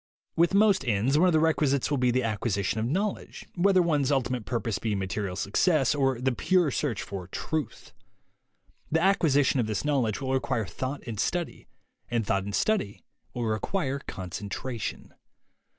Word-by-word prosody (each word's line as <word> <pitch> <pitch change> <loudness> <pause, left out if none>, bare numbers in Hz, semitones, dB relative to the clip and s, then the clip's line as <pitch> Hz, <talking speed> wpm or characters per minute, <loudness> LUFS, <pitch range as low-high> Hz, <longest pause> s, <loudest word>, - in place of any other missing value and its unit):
With 170 +3 +3
most 200 -4 +4
ends, 120 +7 +2
one 185 - +5
of 180 - +3
the 160 - +4
requisities 150 -4 +1
will 145 - +1
be 125 -1 +3
the 130 +1 +1
acquisition 105 -2 -1
of 110 - -1
knowledge 195 - -3
— - - -36
whether 185 0 +4
one's 150 -5 +1
ulti 130 -4 +1
mate 125 -4 -3
purpose 115 -3 -2
be 110 -3 -1
material 95 0 -3
success 135 - +2
or 135 -4 +1
the 130 +1 +1
pure 175 +4 +2
search 130 -5 -2
for 95 -3 -7
Truth. 155 +10 -4 1.0
The 160 - +3
acquisition 155 -8 +3
of 115 - +1
this 110 +4 -2
knowledge 130 -8 +1
will 130 -1 -2
require 125 -4 0
thought 130 +7 -5
and 115 -4 -5
study, 175 - -2 0.4
and 115 -2 0
thought 100 -1 0
and 100 -1 -3
study 195 - 0 0.3
will 120 - -2
require 135 - -1
concentration. 105 +3 -6
130 Hz, 170 wpm, -27 LUFS, 110-155 Hz, 1.0 s, one